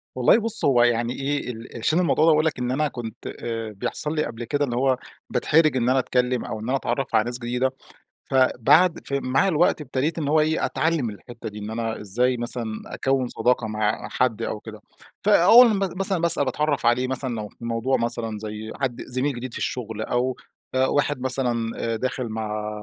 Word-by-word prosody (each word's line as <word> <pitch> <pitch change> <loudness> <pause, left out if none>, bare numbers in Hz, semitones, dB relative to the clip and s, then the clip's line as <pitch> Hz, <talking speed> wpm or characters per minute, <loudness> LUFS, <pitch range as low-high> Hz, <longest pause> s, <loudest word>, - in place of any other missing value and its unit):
والله 125 - +5
بُص 225 0 +1
هو 125 -4 +5
يعني 120 0 +1
إيه 140 -2 -2
ال 115 0 -9
عشان 155 +9 +2
الموضوع 160 -2 +3
ده 165 - +6
باقول 155 +1 +3
لَك 155 - -1
إن 125 0 -1
أنا 150 +3 +1
كنت 120 -5 -8
آآ 115 -2 -5
بيحصل 150 +9 -3
لي 155 - +1
قبل 115 +1 -6
كده 145 +4 0
اللي 120 - -4
هو 130 0 +2 0.3
باتحرج 155 -3 +3
إن 125 0 +1
أنا 130 +1 +3
أتكلم 125 0 0
أو 110 - -5
إن 110 - -8
أنا 135 - +2
أتعرف 135 0 -2
على 110 - +4
ناس 120 +1 -3
جديدة، 125 +2 -1 0.6
فبعد 135 +6 +4
فمع 140 +4 +1
الوقت 165 -2 +2
ابتديت 145 +4 -2
إن 145 - -2
هو 155 +2 +3
إيه 155 +1 +1
أتعلم 160 -7 0
الحتة 110 +3 -9
دي، 105 - -9
إن 105 +1 -6
أنا 115 -1 -3
إزاي 125 +5 +1
مثلًا 120 0 -2 0.2
أكوِّن 135 -1 -1
صداقة 120 -2 0
مع 105 0 -1
حد 125 -4 0
أو 105 - -3
كده. 110 -1 -11 0.4
فأول 210 +5 +7
م 210 -3 +1 0.2
مثلًا 195 -2 +2
بس 170 -1 +7
أنا 145 - +2
باتعرف 145 +1 -1
عليه 120 +2 +3
مثلًا 130 -1 -3
لو 105 -2 -4
في 115 - -12
موضوع 115 +3 0
مثلًا 115 -2 -3
زي 110 +1 -6
حد 125 -3 -2
زميل 130 +3 -2
جديد 125 +1 -6
في - - -5
الشغل، 110 -3 -4
أو 125 +3 -1 0.4
آآ 130 0 +3
واحد 145 0 0
مثلًا 125 -3 0 0.2
آآ - - -1
داخل 130 +1 -3
مع 105 -1 -3
125 Hz, 200 wpm, -24 LUFS, 115-145 Hz, 0.6 s, فأول